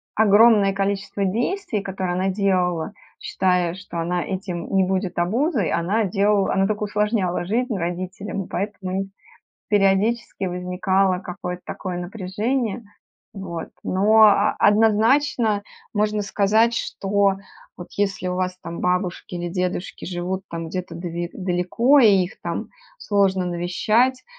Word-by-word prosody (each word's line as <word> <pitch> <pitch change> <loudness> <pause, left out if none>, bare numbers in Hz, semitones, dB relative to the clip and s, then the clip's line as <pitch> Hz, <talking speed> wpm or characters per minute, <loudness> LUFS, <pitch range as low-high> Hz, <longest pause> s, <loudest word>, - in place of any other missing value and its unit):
огромное 210 -1 +5
количество 195 0 -1
действий, 235 - -1
которые 190 -2 -3
она 185 +2 0
делала, 185 -2 0 0.3
считая, 180 -2 0
что 185 -2 -7
она 175 +1 -1
этим 185 -3 -4
не 195 -1 +4
будет 190 0 -2
обузой, 225 - +1
она 195 +7 +1
делал 200 +1 +2
она 195 0 +2
только 210 0 -2
усложняла 210 -3 0
жизнь 235 +4 -1
родителям. 185 +3 -4
И - - -14
поэтому 190 -1 -3
нь 195 - -6 0.6
периодически 205 +2 +1
возникало 180 +1 0
какое-то 180 -1 -6
такое 185 -2 -5
напряжение. 215 +6 -2 0.5
Вот. 175 -4 -6 0.2
Но 210 +4 +4
а 210 -2 +4
однозначно 225 +2 +3 0.3
можно 210 0 0
сказать, 215 +4 +2
что 200 -2 0 0.4
вот 175 - -9
если 195 -2 -1
у 180 - -2
вас 185 0 -2
там 170 -1 -7
бабушки 180 0 -1
или 175 0 -3
дедушки 180 +1 -3
живут, 185 +1 -3
там, 165 0 -5
где-то 180 +2 -5
дави 170 0 -4
далеко 185 +10 +2
и 230 - +7 0.2
их 180 - -10
там - - -4 0.3
сложно 195 - +1
навещать, 215 +9 +1
195 Hz, 130 wpm, -22 LUFS, 180-210 Hz, 0.6 s, и